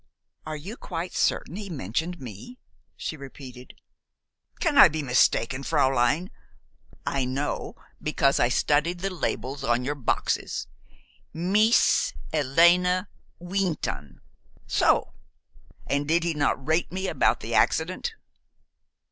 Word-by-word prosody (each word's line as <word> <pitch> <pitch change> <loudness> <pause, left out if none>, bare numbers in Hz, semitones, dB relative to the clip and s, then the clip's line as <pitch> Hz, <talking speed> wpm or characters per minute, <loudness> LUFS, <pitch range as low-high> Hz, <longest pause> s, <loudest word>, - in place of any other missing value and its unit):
"Are 155 - -4
you 190 +11 -8
quite 170 +2 -5
certain 180 - 0
he 205 -2 -6
mentioned 160 - -3
me?" 125 - -10 0.4
she - - -5
repeated. 130 -3 -11 0.8
"Can 330 -5 +1
I 280 - +10
be 155 -1 -3
mistaken, 125 0 +2
fräulein. 140 +3 +1 0.8
I 135 -1 0
know, 130 +3 -3 0.3
because 140 -2 +2
I 120 - +3
studied 150 +7 +1
the 195 +1 -1
labels 140 -5 -3
on 120 +1 +1
your 145 - -1
boxes. 140 -5 -1 0.7
Mees 215 - +3 0.2
Hélène 175 +6 +4 0.3
Weenton 175 - -3 0.4
so? - - +2 0.7
And 140 +1 -1
did 165 +2 +2
he 170 -1 0
not 145 -3 0
rate 160 +2 +1
me 190 +1 -3
about - - +1
the - - -5
accident?" 475 -2 +1
155 Hz, 115 wpm, -26 LUFS, 135-180 Hz, 0.8 s, I